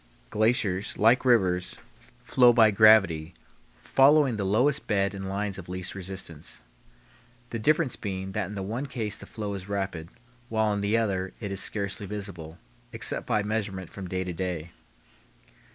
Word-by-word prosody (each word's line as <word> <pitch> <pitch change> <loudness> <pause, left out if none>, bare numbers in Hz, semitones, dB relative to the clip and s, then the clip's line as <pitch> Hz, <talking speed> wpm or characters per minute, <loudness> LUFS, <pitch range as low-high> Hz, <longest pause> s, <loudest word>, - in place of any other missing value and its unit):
Glaciers, 105 -3 +1
like 115 +4 +4
rivers, 95 -8 +2 0.5
flow 125 -1 +5
by 110 -2 +6
gravity, 100 -6 +5 0.5
following 140 -2 +4
the 105 - -2
lowest 125 +10 +2
bed 100 -2 +1
and 95 -1 -6
lines 100 0 -2
of 90 - -11
least 90 0 -4
resistance; 95 -7 -7 0.9
the 115 - -3
difference 150 +3 +2
being 95 -2 -5
that 95 - -2
in 105 - -8
the 95 - -4
one 115 +8 -4
case 110 -5 -3
the - - -10
flow 105 -2 -5
is 95 0 -7
rapid, 95 -5 -3 0.4
while 110 -1 +1
in 100 - -2
the 105 +3 +1
other 95 -4 -1
it 100 -3 -5
is 100 - -1
scarcely 100 0 -2
visible, 95 -6 -7 0.3
except 115 - -1
by 110 -4 +1
measurement 105 -4 -3
from 95 -2 -7
day 95 +1 -2
to 90 -1 -5
day. 85 -2 -4
100 Hz, 160 wpm, -27 LUFS, 95-110 Hz, 0.9 s, by